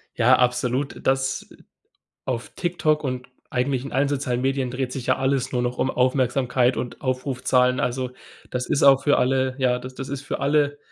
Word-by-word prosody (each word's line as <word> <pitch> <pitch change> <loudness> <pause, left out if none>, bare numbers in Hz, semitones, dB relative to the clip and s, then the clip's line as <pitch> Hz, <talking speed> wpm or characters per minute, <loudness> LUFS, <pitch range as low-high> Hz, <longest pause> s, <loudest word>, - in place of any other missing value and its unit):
Ja, 125 +2 +5
absolut, 125 +2 0
das 135 0 0 0.8
auf 125 -2 -3
TikTok 160 -4 0
und 125 -1 -3 0.2
eigentlich 130 0 -1
in 140 - -7
allen 135 +2 +2
sozialen 130 -3 -1
Medien 135 -1 0
dreht 125 0 -3
sich 130 -3 -5
ja 130 - +3
alles 135 -1 0
nur 125 -1 0
noch 125 0 -2
um 130 - +1
Aufmerksamkeit 125 -1 +1
und 125 - -5
Aufrufzahlen. 130 -1 +1
Also 125 0 -1 0.4
das 125 0 -2
ist - - 0
auch 135 -1 +6
für 145 - +3
alle 130 0 +1
Ja, 125 -2 +2
d 125 - -7
das 135 - -6
ist 140 0 -5
für 145 - -4
alle 145 0 +2
130 Hz, 180 wpm, -23 LUFS, 125-135 Hz, 0.8 s, auch